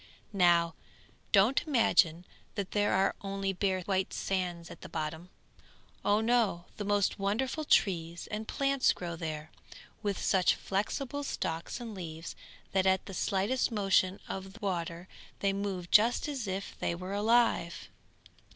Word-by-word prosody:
Now 170 -3 +4 0.6
don't 210 +7 +5
imagine 190 - +3 0.3
that 200 -3 -3
there 205 0 +2
are 190 +1 +3
only 195 -1 -2
bare 190 0 0
white 190 +1 -1
sands 180 -3 -2
at - - -11
the - - -9
bottom; 160 +2 -4 0.7
oh 205 +1 +3
no! 220 -7 +2
the 205 - -3
most 205 -1 +1
wonderful 245 +10 -1
trees 170 - +2
and 215 +1 -4
plants 275 -1 +2
grow 170 -2 -5
there, 155 -1 -5 0.5
with 205 -3 -1
such 185 -2 +3
flexible 260 +8 -2
stalks 165 -7 -3
and 235 -2 -6
leaves, 165 -3 -7 0.4
that 190 0 +2
at 190 0 +2
the 195 - -8
slightest 200 +8 0
motion 195 -3 +2
of 190 0 -6
the 230 - -13
water 175 -3 -3 0.3
they 195 -1 +1
move 195 -3 -3
just 230 +7 +5
as 270 -7 -3
if 190 +1 -4
they 170 - -1
were 185 +3 -6
alive. 210 -5 +2
195 Hz, 145 wpm, -31 LUFS, 175-210 Hz, 0.7 s, don't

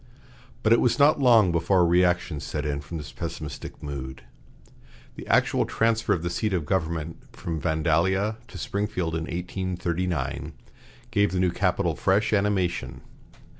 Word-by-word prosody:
But 110 - +5
it 115 - +4
was 125 - +2
not 145 +1 +5
long 115 -8 +5
before 85 +3 +2
a - - +5
reaction 90 -2 +2
set 75 +1 -4
in 70 -1 -2
from 70 +4 -7
this 75 - -8
pessimistic - - -7
mood. 65 -3 -6 0.9
The - - -9
actual - - +3
transfer 115 0 +1
of 85 - +1
the 85 - -1
seat 105 +3 -1
of 85 -5 -1
government 85 -2 -2 0.2
from 80 -2 -4
Vandalia 90 +7 +1
to - - -10
Springfield 100 -7 -2
in 80 0 -2
1839 85 -5 -3 0.6
gave 100 0 +2
the 95 - -1
new 90 -1 +2
capital - - 0
fresh 100 +3 +1
animation. 95 -10 0
90 Hz, 150 wpm, -26 LUFS, 80-100 Hz, 0.9 s, But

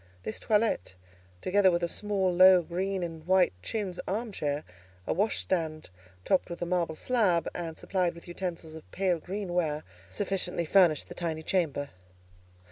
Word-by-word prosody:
This 110 - -4
toilette, 210 - +1 0.5
together 190 +1 +4
with 175 -1 0
a - - +2
small, 195 -1 0
low, 185 0 +7
green 185 +3 -2
and 165 -2 -6
white 185 - +4
chintz 195 - -3
arm 220 +4 -2
chair, 145 -5 -2 0.4
a - - 0
washstand 165 - -1 0.3
topped 190 - +2
with 170 - -6
a - - -1
marble 170 -2 0
slab, 185 -6 +1
and 165 -2 -5
supplied 180 -3 -1
with 170 - -13
utensils 175 -3 -5
of 160 -1 -11
pale 185 -3 +1
greenware, 175 -5 -2 0.3
sufficiently 180 - -1
furnished 170 -3 +4
the - - -8
tiny 160 -2 -3
chamber. 155 -6 -1
180 Hz, 150 wpm, -29 LUFS, 165-190 Hz, 0.5 s, low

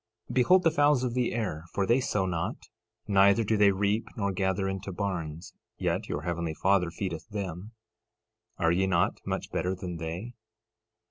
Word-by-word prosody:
13:26 - - -5
Behold 180 +9 +5
the 165 - +4
fowls 145 -4 +3
of 125 -2 -1
the 125 -1 +1
air, 95 -10 -2
for 100 - +2
they 120 +5 +3
sow 105 -6 0
not, 85 -3 -2 0.5
neither 100 +2 +5
do 110 +1 +1
they 105 -1 +6
reap 105 +3 0
nor 100 -2 0
gather 95 +1 0
into 95 0 -4
barns; 85 -4 -4 0.2
yet - - -1
your 75 - -3
heavenly 85 -2 -2
Father 95 -1 +2
feedeth 85 +1 -5
them. 100 0 -5 0.8
Are 80 - +2
ye 95 +2 +2
not 85 -2 +1
much - - -3
better 90 +1 -1
than 90 -2 -6
they? 85 +9 -5
95 Hz, 175 wpm, -28 LUFS, 85-110 Hz, 0.8 s, they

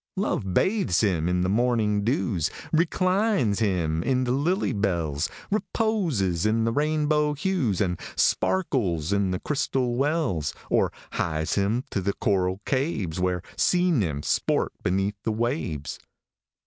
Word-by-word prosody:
Love 115 - -1
bathes 190 - +2
him 90 -5 +1
in 90 0 +1
the 90 - +1
morning 110 -1 +1
dews, 105 - 0 0.2
Reclines 185 - +2
him 85 -7 0
in 130 +5 +1
the 125 - -1
lily 165 - +1
bells, 85 -8 -1 0.2
Reposes 175 - 0
in 110 +1 +2
the 115 - +1
rainbow 150 +2 +1
hues, 150 - 0
And 90 -3 0 0.2
sparkles 100 - +1
in 100 -1 +1
the 90 - -1
crystal 135 -4 -1
wells, 135 - 0 0.2
Or - - +3 0.2
hies 80 -1 -1
him 105 +5 +1
to 100 - -1
the 100 +2 0
coral 95 -1 0
caves, 110 - -1
Where 90 -1 0
sea 180 0 +2
nymphs 85 - 0
sport - - +1
beneath 95 +3 -1
the 110 - -1
waves. 110 - -2
110 Hz, 135 wpm, -25 LUFS, 90-150 Hz, 0.2 s, Or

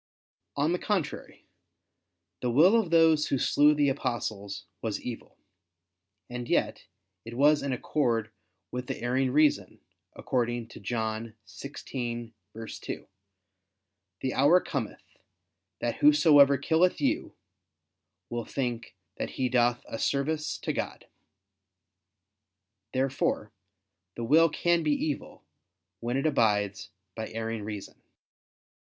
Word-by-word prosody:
On 145 +3 +1
the 180 - 0
contrary, 195 -8 -3 1.0
The 125 - 0
will 160 - +6
of 220 -7 +2
those 160 -2 +4
who 135 - +1
slew 150 +3 +4
the 145 -1 +3
apostles 110 -8 -3 0.2
was 110 -3 -2
evil. 120 -2 -8 0.9
And 120 -1 -6
yet - - 0 0.4
it 115 +1 -8
was 145 +2 +5
in 140 - -2
accord 120 -4 0 0.4
with 125 0 -4
the - - -4
erring 130 +2 +1
reason, 140 -9 +2 0.4
according 120 -2 -2
to - - -11
John 110 +1 -3
16:2: 120 -6 -7 1.2
"The 130 - -1
hour 145 +7 +5
cometh, - - -5 0.8
that - - -1
whosoever 150 - +6
killeth 165 +6 +2
you, 290 +5 -1 0.9
will 120 -1 -4
think 120 -4 -4 0.2
that - - -3
he 130 -1 +1
doth 120 0 +2
a 115 - -6
service 150 +2 -1
to - - -2
God." - - -4 1.9
Therefore 130 -5 -1 0.6
the 120 - -4
will 160 +7 +5
can 170 +3 +1
be 150 -2 +2
evil, 145 0 -3 0.6
when 120 +2 -2
it 135 - -1
abides 105 -9 +1 0.2
by 110 +2 -5
erring 115 0 -4
reason. 105 -1 -7
130 Hz, 115 wpm, -28 LUFS, 115-150 Hz, 1.9 s, will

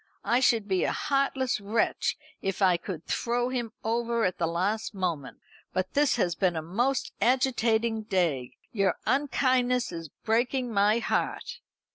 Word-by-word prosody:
I 240 - +3
should 230 -5 +3
be 190 -2 +1
a - - +1
heartless 275 -4 0
wretch 210 +3 0 0.2
if 195 -1 -2
I 185 -3 +5
could 170 -1 -6
throw 240 +1 0
him 240 -3 -3
over 235 +1 0
at 185 - -1
the 165 - +1
last 200 +6 -1
moment. 170 -8 -3 0.4
But 185 0 -2
this 290 0 +3
has 180 -7 +1
been 180 -1 +1
a 160 - -1
most 240 +11 -1
agitating 230 -2 +2
day. 160 -10 0
Your 195 -5 +1
unkindness 255 -4 +1
is 165 -2 -6 0.2
breaking 240 +2 +1
my 205 +2 +4
heart." 235 - -2
220 Hz, 150 wpm, -28 LUFS, 185-245 Hz, 0.4 s, I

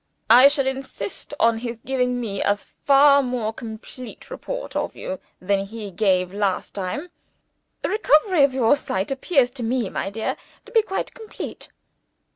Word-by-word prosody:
"I 250 +4 +10
shall 280 -1 +2
insist 265 -7 -4
on 230 -1 +3
his 235 0 -5
giving 250 -1 0
me 205 -5 -3
a 205 - +3
far 280 +5 +4
more 245 -4 -2
complete 230 +2 -10
report - - -6
of - - -2
you 185 - -5 0.2
than 195 +2 +1
he 210 0 -7
gave 185 -2 +1
last 200 -2 -1
time. 200 - -4 0.7
The - - 0
recovery 365 -5 +4
of 275 - +4
your 255 +1 +4
sight 195 -5 -2
appears 270 -2 +2
to 250 -2 -6
me, 235 -2 -1
my 195 - -2
dear, 220 +2 -3 0.3
to - - -14
be 455 - +5
quite 385 -3 -4
complete." 445 -2 -8
245 Hz, 160 wpm, -23 LUFS, 205-280 Hz, 0.7 s, I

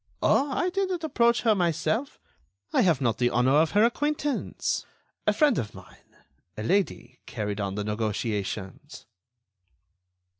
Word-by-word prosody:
"Oh! 280 +2 +3
I 360 +6 0
didn't 375 -3 -1
approach 235 -6 +2
her 225 -2 +4
myself. 180 - -1 0.5
I - - +4
have 165 -7 +3
not 115 -4 0
the 120 -1 +3
honor 125 +2 +2
of 160 +1 +4
her 205 +1 +5
acquaintance. 290 +3 -1 0.4
A - - +6
friend 295 - +3
of 105 -4 -5
mine, - - -16 0.4
a 110 - -4
lady, 130 - -1
carried 105 -2 -3
on 100 -1 -3
the 105 - -2
negotiations." 105 +4 -4
160 Hz, 140 wpm, -26 LUFS, -, 0.5 s, A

